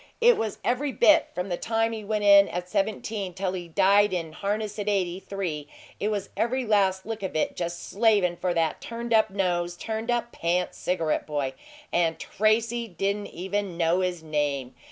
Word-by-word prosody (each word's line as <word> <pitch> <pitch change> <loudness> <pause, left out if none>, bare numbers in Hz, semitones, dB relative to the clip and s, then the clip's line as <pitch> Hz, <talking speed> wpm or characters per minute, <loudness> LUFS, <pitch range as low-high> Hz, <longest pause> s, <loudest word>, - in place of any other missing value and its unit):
It 475 0 +6
was 215 -1 -3
every 270 +3 0
bit 310 +4 +5
from 180 +2 -3
the 175 - -1
time 225 +2 0
he 220 -1 -5
went 210 0 -1
in 200 -1 +7
at 180 +1 -4
seventeen 200 -1 -2
till 190 -1 -2
he 175 -2 -5
died 200 +3 +4
in 165 -3 -2
harness 210 +3 -3
at 205 0 -1
eighty 185 -3 0
three 175 -8 -4 0.3
it 205 - 0
was 205 -2 -2
every 255 +2 0
last 195 -3 +2
lick 225 -1 -5
of 190 -4 -4
it 155 - 0
just 170 0 -4
slavin' 205 -5 +3
for 180 +1 -1
that 165 -1 0
turned 235 0 -4
up 220 -1 +4
nose, 175 -3 -1
turned 220 +3 -4
up 240 0 0
pants 175 +2 -1
cigarette 165 -4 -1
boy. 145 -3 -2 0.4
AND 165 -2 +2
TRACY 230 +3 +1
DIDN'T 200 +2 -2
EVEN 190 0 -3
KNOW 170 +2 +2
HIS 180 -3 -2
NAME! 145 -4 -1
195 Hz, 185 wpm, -26 LUFS, 175-220 Hz, 0.4 s, in